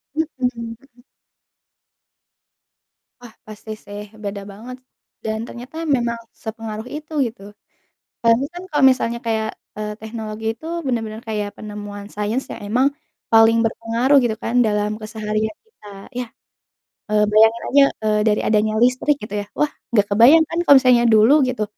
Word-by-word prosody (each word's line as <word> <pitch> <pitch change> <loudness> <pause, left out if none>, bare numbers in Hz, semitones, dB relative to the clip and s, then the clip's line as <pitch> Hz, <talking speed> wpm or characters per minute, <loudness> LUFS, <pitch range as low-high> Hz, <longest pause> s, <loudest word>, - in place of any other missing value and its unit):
Mhm 320 +1 +1 0.3
mhm. 230 -1 -6 2.5
Wah, 240 -2 -12
pasti 215 +1 -9
sih 205 0 -7 0.2
beda 200 0 -4
banget, 235 +6 -9 0.5
dan 220 0 -2
ternyata 250 +5 -10 0.2
memang 235 -2 -2 0.2
sepengaruh 220 0 -6
itu, 310 +1 -8
gitu. 230 -2 -11 0.8
Soalnya 230 +3 +3
kan 350 - -7
kalau 295 -3 +2
misalnya 235 -2 -1
kayak, 220 -1 0 0.3
eee, 210 0 -3
teknologi 220 0 -7
itu 315 - -12 0.2
bener-bener 225 -3 -3
kayak 210 -2 -3
penemuan 205 -1 -8
sains 210 +5 -1
yang - - -7
emang 250 +5 +2 0.4
paling 225 0 +6
berpengaruh, 230 +4 +1
gitu 230 -2 0
kan, 230 - -3
dalam 210 -1 0
keseharian 215 0 -3
kita, 440 - -20 0.3
iya, 250 -1 -2 0.8
eee, 210 0 +3
bayangin 225 +2 +5
aja, 280 +1 +6 0.2
eee, 210 0 +2
dari 210 -1 +2
adanya 215 0 +2
listrik, 250 +5 +3
gitu 210 - -7
ya. - - -8
Wah, 300 - +1 0.2
nggak 205 -3 +4
kebayang 260 +10 +7
kan, 330 - -4
kalau 285 - +8
misalnya 250 -2 +4
dulu 220 +5 +6 0.2
gitu, 245 -4 -2
225 Hz, 145 wpm, -20 LUFS, 215-245 Hz, 2.5 s, kalau